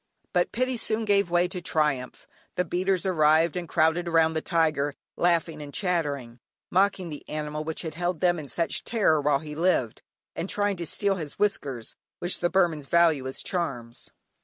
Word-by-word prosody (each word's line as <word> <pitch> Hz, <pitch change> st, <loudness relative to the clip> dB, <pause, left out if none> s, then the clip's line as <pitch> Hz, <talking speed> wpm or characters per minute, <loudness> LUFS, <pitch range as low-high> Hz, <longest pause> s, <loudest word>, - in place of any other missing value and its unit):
But 175 Hz, -1 st, +2 dB
pity 255 Hz, +2 st, -1 dB
soon 220 Hz, 0 st, -1 dB
gave 200 Hz, -3 st, +3 dB
way 175 Hz, +1 st, +3 dB
to 180 Hz, -1 st, -5 dB
triumph. 150 Hz, -6 st, -1 dB, 0.3 s
The 180 Hz, -, 0 dB
beaters 185 Hz, +2 st, 0 dB
arrived 160 Hz, -2 st, +3 dB
and 175 Hz, -2 st, -4 dB
crowded 165 Hz, +2 st, +2 dB
round 160 Hz, -1 st, +3 dB
the 160 Hz, -, 0 dB
tiger, 150 Hz, -4 st, +1 dB, 0.2 s
laughing 165 Hz, -3 st, +1 dB
and 145 Hz, -1 st, -8 dB
chattering; 145 Hz, -, -2 dB, 0.3 s
mocking 190 Hz, -1 st, +2 dB
the 150 Hz, -, -8 dB
animal 150 Hz, 0 st, -3 dB
which 160 Hz, +2 st, -4 dB
had 160 Hz, -, -4 dB
held 175 Hz, +1 st, -2 dB
them 175 Hz, -2 st, +2 dB
in 150 Hz, -, -7 dB
such 165 Hz, +4 st, -1 dB
terror 200 Hz, -10 st, +2 dB
while 145 Hz, -1 st, +3 dB
he 150 Hz, +1 st, -8 dB
lived, 155 Hz, -8 st, 0 dB, 0.3 s
and 180 Hz, -, -4 dB
trying 205 Hz, -1 st, 0 dB
to 170 Hz, -1 st, -4 dB
steal 200 Hz, +3 st, 0 dB
his 155 Hz, -5 st, -7 dB
whiskers, 140 Hz, -, -1 dB, 0.2 s
which 175 Hz, +1 st, 0 dB
the 175 Hz, -, +1 dB
Burmans 170 Hz, -7 st, +1 dB
value 160 Hz, -5 st, +3 dB
as 130 Hz, -, -2 dB
charms. 125 Hz, -10 st, -4 dB
165 Hz, 180 wpm, -26 LUFS, 150-180 Hz, 0.3 s, gave